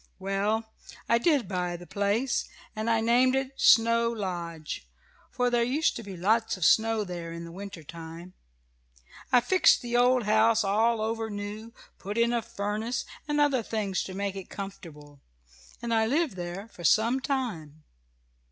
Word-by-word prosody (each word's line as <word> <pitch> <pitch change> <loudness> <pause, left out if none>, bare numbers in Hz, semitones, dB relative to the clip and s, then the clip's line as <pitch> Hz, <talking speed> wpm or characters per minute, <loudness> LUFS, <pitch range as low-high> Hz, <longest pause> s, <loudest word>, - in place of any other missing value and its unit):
Well, 205 +3 -1 0.3
I 235 - +3
did 285 -1 +2
buy 180 -2 -2
the 175 - -12
place, 205 +7 0 0.3
and 215 +1 -2
I 225 -1 +2
named 245 +3 +3
it 270 0 -1
'Snow 230 0 +5
Lodge,' 170 - -5 0.4
for 245 0 0
there 240 -1 +2
used 280 +7 +1
to - - -5
be 195 -4 -8
lots 220 +4 +1
of 185 - 0
snow 225 -1 +4
there 175 -3 -6
in 170 0 -7
the 170 - -9
winter 195 -2 -8
time. 165 +3 -10 1.0
I 250 -2 +6
fixed 370 +4 +4
the 240 0 -3
old 250 0 +4
house 220 +1 +3
all 220 +3 +2
over 225 0 -2
new, 210 +2 -6 0.3
put 205 +3 -5
in 235 +1 +3
a 235 - +1
furnace, 215 +4 -3 0.2
and 295 0 0
other 285 -4 +3
things 210 -4 -2
to 185 - -7
make 200 0 -2
it 195 -2 -8
comfortable, 150 -8 -9 0.6
and 235 -1 -1
I 220 -1 +3
lived 290 - 0
there 180 +3 -6
for 175 - -12
some 230 +9 +3
time. 200 - -4
215 Hz, 165 wpm, -28 LUFS, 185-235 Hz, 1.0 s, I